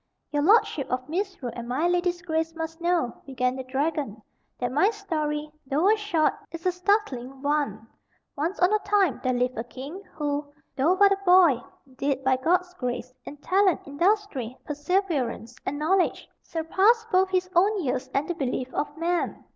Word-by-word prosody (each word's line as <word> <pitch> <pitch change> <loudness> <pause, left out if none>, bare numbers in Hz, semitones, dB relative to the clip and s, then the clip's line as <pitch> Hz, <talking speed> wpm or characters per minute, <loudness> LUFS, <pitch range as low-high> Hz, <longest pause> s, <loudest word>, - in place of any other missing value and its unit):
"Your 290 -1 +1
lordship 320 - +3
of 255 0 -2
Misrule 350 - -3
and 235 0 -6
my 275 +8 +1
lady's 355 0 0
grace 325 -1 -1
must 325 +1 -5
know," 340 -8 0
began 255 -1 0
the 260 - -5
dragon, 275 -3 -2 0.4
"that 245 0 -2
my 300 +10 +4
story, 305 -8 -3 0.2
though 310 +10 +3
a - - +5
short, 375 -8 +1 0.2
is 335 +1 -8
a 365 - +4
startling 345 - -1
one. 285 -7 0 0.5
Once 325 +6 -2
on 360 +3 +4
a 425 - +4
time 400 -8 +2
there 255 - +2
lived 250 -1 0
a - - -1
king, 275 +9 -8
who, 290 -1 -2 0.2
though 310 +7 +3
but 400 +1 +5
a 395 - +2
boy, 355 -9 +6 0.4
did, 275 -1 -1
by 265 0 +3
God's 355 +7 +1
grace, 250 -4 -4
in 295 - -8
talent, 375 +4 +2
industry, 285 - 0
perseverance, 290 - -1
and 290 - -1
knowledge, 355 +5 +1
surpass 390 +8 +2
both 375 0 +4
his 370 -1 +1
own 395 +2 +3
years 260 -1 -2
and 275 +2 0
the 350 - -1
belief 260 -4 -3
of 295 +1 -3
men. 345 +1 -1
310 Hz, 170 wpm, -26 LUFS, 265-365 Hz, 0.5 s, boy